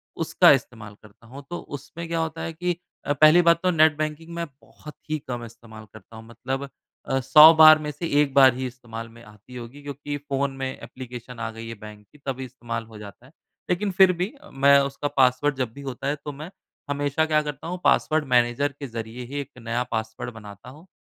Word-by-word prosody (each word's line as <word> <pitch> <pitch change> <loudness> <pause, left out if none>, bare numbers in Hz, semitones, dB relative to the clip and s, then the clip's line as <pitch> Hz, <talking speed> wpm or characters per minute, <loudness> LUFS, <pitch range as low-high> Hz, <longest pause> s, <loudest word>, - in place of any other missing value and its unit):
उसका - - +4
इस्तेमाल 115 -5 -2
करता 110 +2 -19
हूँ। 135 +3 -11
तो 175 - -4 0.2
उसमें 165 +4 -9
क्या 165 0 -2
होता 160 0 -3
है 165 - -4
कि 175 +1 -2 0.3
अ, 145 - +1
पहली 155 +4 +6
बात 170 -1 +4
तो 180 - +3
नेट 155 -2 +4
बैंकिंग 155 +2 -4
मैं 170 0 -3 0.2
बहुत 150 - -14
ही 155 - 0
कम 120 -2 -4
इस्तेमाल 110 -1 -13
करता 110 +1 -15
हूँ। 110 0 -11
मतलब 135 +3 -5 0.4
अ, 135 0 0
100 155 +5 +8
बार 155 -1 +8
में 150 -1 -4
से 165 +3 -5
1 140 -2 -1
बार 130 -3 +7
ही 130 0 -3
इस्तेमाल 115 -2 -9
में 115 +1 -16
आती 105 +4 -16
होगी 125 +4 -9
क्योंकि 145 +1 -5
फ़ोन 140 -1 -2
में 135 0 -3
एप्लिकेशन 125 -2 -10
आ 115 - -3
गई 115 +1 -9
है 115 - -7
बैंक 105 -1 -12
की 150 - -19
तभी 130 0 -3
इस्तेमाल 115 -2 -6
हो 110 -1 -13
जाता 105 +3 -12
है। 135 - -19 0.4
लेकिन 195 +3 0
फ़िर 190 0 +6
भी 180 +9 -3 0.2
मैं 140 +1 +5
उसका 140 +1 -3
पासवर्ड 130 +2 +3
जब 125 -4 -2
भी 140 - -11
होता 135 0 -5
है 145 - 0
तो 145 - -4
मैं 150 +5 -9 0.4
हमेशा 145 +2 0
क्या 155 -1 +2
करता 150 +1 -7
हूँ 180 +1 -4
पासवर्ड 150 +2 +2
मैनेजर 125 +3 +2
के 140 - -5
ज़रिए 115 +1 -7
ही 140 +3 -5
एक 140 - -10
नया 115 +1 -2
पासवर्ड 110 +1 -4
बनाता 105 +1 -12
हूँ। 155 +7 -15
135 Hz, 215 wpm, -24 LUFS, 120-155 Hz, 0.4 s, 100